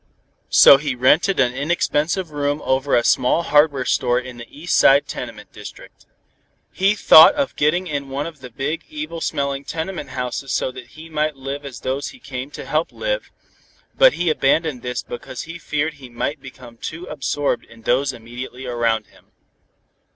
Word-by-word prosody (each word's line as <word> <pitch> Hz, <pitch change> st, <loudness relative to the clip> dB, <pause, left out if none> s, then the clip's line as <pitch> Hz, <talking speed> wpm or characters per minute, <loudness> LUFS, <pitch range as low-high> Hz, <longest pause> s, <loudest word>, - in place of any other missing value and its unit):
So 140 Hz, -, +8 dB
he 140 Hz, -2 st, -3 dB
rented 150 Hz, +10 st, +3 dB
an 125 Hz, -2 st, +3 dB
inexpensive 155 Hz, +4 st, -1 dB
room 145 Hz, 0 st, -1 dB
over 135 Hz, +1 st, +1 dB
a 120 Hz, -, +3 dB
small 125 Hz, +9 st, +2 dB
hardware 145 Hz, -4 st, +3 dB
store 120 Hz, 0 st, +1 dB
in 125 Hz, -1 st, -9 dB
the 120 Hz, -1 st, -10 dB
East 160 Hz, +5 st, -3 dB
Side 140 Hz, +1 st, +5 dB
tenement -, -, -8 dB
district. -, -, -12 dB, 0.6 s
He 195 Hz, +3 st, +2 dB
thought 160 Hz, -5 st, +8 dB
of 285 Hz, -2 st, -1 dB
getting 155 Hz, +5 st, +1 dB
in 140 Hz, -5 st, -4 dB
one 140 Hz, +2 st, -3 dB
of 165 Hz, -3 st, -8 dB
the 130 Hz, -1 st, -10 dB
big, 135 Hz, +7 st, -4 dB
evil 300 Hz, -, -6 dB
smelling 140 Hz, -2 st, -2 dB
tenement 160 Hz, -1 st, -5 dB
houses 130 Hz, +1 st, -4 dB
so 130 Hz, -, 0 dB
that 130 Hz, -1 st, -11 dB
he 160 Hz, +1 st, -10 dB
might 155 Hz, -1 st, -1 dB
live 135 Hz, +2 st, -6 dB
as 130 Hz, -4 st, -10 dB
those 135 Hz, +2 st, -2 dB
he 255 Hz, -, -11 dB
came 130 Hz, -, -6 dB
to -, -, -9 dB
help 155 Hz, +2 st, -1 dB
lived, -, -, -3 dB, 0.7 s
but -, -, +6 dB
he 175 Hz, -2 st, 0 dB
abandoned 150 Hz, -2 st, +1 dB
this 125 Hz, 0 st, -4 dB
because 120 Hz, 0 st, -7 dB
he 165 Hz, +1 st, -9 dB
feared 150 Hz, 0 st, -2 dB
he 135 Hz, -4 st, -13 dB
might 135 Hz, +4 st, -4 dB
become 125 Hz, -3 st, -13 dB
too 165 Hz, +8 st, -7 dB
absorbed 145 Hz, -3 st, -2 dB
in 115 Hz, 0 st, -18 dB
those 130 Hz, +4 st, +1 dB
immediately 125 Hz, +2 st, -9 dB
around 115 Hz, -3 st, 0 dB
him. -, -, -24 dB
140 Hz, 175 wpm, -20 LUFS, 125-160 Hz, 0.7 s, So